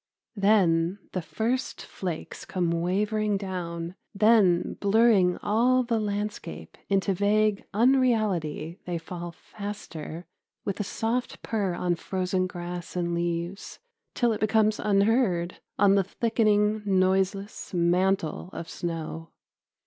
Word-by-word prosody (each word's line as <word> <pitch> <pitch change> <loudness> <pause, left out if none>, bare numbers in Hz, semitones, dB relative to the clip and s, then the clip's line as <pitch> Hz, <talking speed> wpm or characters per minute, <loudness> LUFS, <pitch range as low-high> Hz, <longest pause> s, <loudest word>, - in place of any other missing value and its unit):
Then 190 -4 +3
the 185 - -2
first 220 +11 -2
flakes 175 -4 -6
come 175 -3 -1
wavering 205 +5 0
down, 175 -3 -4 0.2
then 205 -4 +4
blurring 200 -3 +4
all 245 +5 +3
the 235 -2 0
landscape 210 0 -4
into 195 0 +2
vague 205 +2 +2
unreality 215 - +1
they 175 -1 -1
fall 175 +1 -6
faster, 180 -4 -7 0.4
with 200 - -2
a - - +1
soft 230 +5 -2
purr 200 -6 -1
on 175 0 0
frozen 185 +1 -1
grass 175 0 -6
and 175 -1 -1
leaves 170 +2 -3 0.4
till 240 -2 +2
it 215 - -4
becomes 215 0 +2
unheard 200 -4 +2 0.2
on 200 -1 +5
the 195 -1 +4
thickening 215 0 +1
noiseless 190 +1 0
mantle 180 -1 +1
of 165 - -6
snow. 165 -1 -5
195 Hz, 115 wpm, -27 LUFS, 175-215 Hz, 0.4 s, on